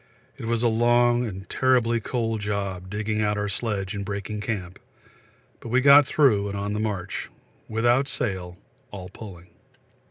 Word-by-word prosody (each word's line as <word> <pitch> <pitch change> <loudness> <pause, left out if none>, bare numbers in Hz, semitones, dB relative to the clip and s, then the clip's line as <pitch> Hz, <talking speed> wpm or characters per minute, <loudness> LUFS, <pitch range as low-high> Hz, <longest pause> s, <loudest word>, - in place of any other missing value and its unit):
It - - -6
was 115 0 0
a - - +4
long 120 +1 +3
and 95 -2 -8
terribly 125 -3 +2
cold 115 -1 -2
job 100 -3 -3
digging 105 +2 -2
out 105 0 0
our 105 0 -1
sledge 100 -1 -3
and 100 -1 -4
breaking 100 +1 -4
camp, 95 -5 -4 0.8
but 115 - -9
we 125 +3 +3
got 140 +1 +7
through 110 -11 +3
and 100 - -4
on 100 +1 -3
the 105 - -2
march 100 -3 -3 0.4
without 120 +5 +2
sail, 95 -10 -3 0.3
all 95 -3 -8
pulling. 90 -4 -11
105 Hz, 160 wpm, -25 LUFS, 100-120 Hz, 0.8 s, got